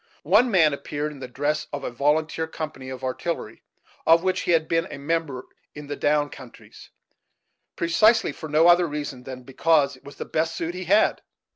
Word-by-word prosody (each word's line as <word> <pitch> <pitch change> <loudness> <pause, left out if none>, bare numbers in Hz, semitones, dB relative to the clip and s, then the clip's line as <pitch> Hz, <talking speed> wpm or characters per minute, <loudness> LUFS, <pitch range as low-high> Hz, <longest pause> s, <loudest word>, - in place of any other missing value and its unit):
One 250 - +4
man 165 -8 +4
appeared 145 +1 -4
in 145 - -11
the 130 - -6
dress 150 +4 -2
of 145 - -5
a - - -3
volunteer 155 +5 0
company 155 -5 -7
of 130 0 -8
artillery, 130 -3 -4 0.5
of 165 +1 +6
which 185 0 0
he - - -1
had 160 -1 +2
been 165 +1 0
a - - -7
member 145 -3 -2 0.3
in 150 -1 -8
the 145 0 -5
"down 145 0 +1
countries," 130 -3 -13 0.9
precisely 215 +7 +3
for 155 - -9
no 155 +3 +4
other 175 0 +5
reason 145 -4 -6
than 130 -1 -8
because 140 +2 +2
it 130 - -21
was 140 - -12
the - - -6
best 160 +1 -1
suit 170 +1 -3
he 185 0 -6
had. 205 +5 +3
150 Hz, 190 wpm, -24 LUFS, 140-165 Hz, 0.9 s, of